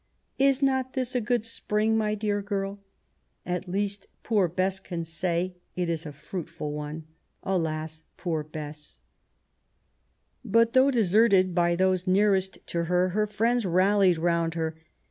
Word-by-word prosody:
Is 275 0 +3
not 265 -1 +1
this 255 -2 -2
a 250 - +1
good 230 0 0
spring, 220 -1 0
my 215 -1 +1
dear 205 -1 -1
girl? 200 0 -3 0.7
At 180 +1 -3
least 200 +2 -2 0.2
poor 205 -5 +2
Bess 185 +3 -1
can 175 -3 -5
say 170 +2 -2 0.2
it 180 -1 -1
is 165 -1 -2
a - - -6
fruitful 165 0 -6
one. 150 +1 -5 0.4
Alas, 160 -3 -2 0.2
poor 160 -4 -2
Bess 150 0 -8
I - - -43 1.4
But, 230 0 +3
though 260 +1 +6
deserted 200 -5 +4
by 175 0 +2
those 185 0 +1
nearest 190 0 +2
to 170 0 -1
her, 180 +2 +2
her 210 +3 0
friends 230 +3 +1
rallied 185 0 +3
round 170 0 0
her. 160 -1 -2
185 Hz, 145 wpm, -27 LUFS, 170-210 Hz, 1.4 s, though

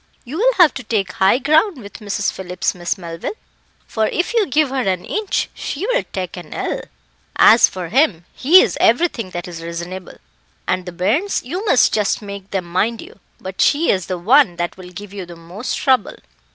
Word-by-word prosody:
You'll 390 - +1
have 350 -5 +6
to 265 - -7
take 210 -4 -1
high 190 +5 +3
ground 310 +7 +2
with 200 -4 -11
Mrs. 205 -2 -2
Phillips, 180 -1 -3
Miss 175 0 -3
Melville, 170 - -6 0.5
for 220 -1 -1
if 350 +6 -2
you 445 -5 +2
give 295 +1 +2
her 270 -1 0
an 185 -5 -1
inch 425 -2 -1
she 315 +8 -4
will - - +1
take 185 -3 -4
an 175 -3 -9
ell. - - -3 0.5
As 230 - +7
for 180 -3 -6
him, 210 - +2
he 340 +8 +6
is - - -2
everything 235 - +2
that 175 -1 -6
is 170 -2 -8
reasonable; 170 +2 -7 0.5
and 185 0 -1
the - - -4
bairns, 215 - 0
you 355 +11 -4
must 315 - +4
just 210 -2 +1
make 200 -2 -9
them 190 -3 -2
mind 205 +7 -1
you. - - -12 0.2
But 190 0 -5
she 305 +3 +3
is 185 -3 -1
the 185 - -3
one 215 +1 +4
that 175 0 -3
will 185 -1 -11
give 200 +2 -10
you 190 -3 -7
the 175 - -10
most 175 +8 -5
trouble." 260 -3 +1
200 Hz, 195 wpm, -19 LUFS, 180-280 Hz, 0.5 s, As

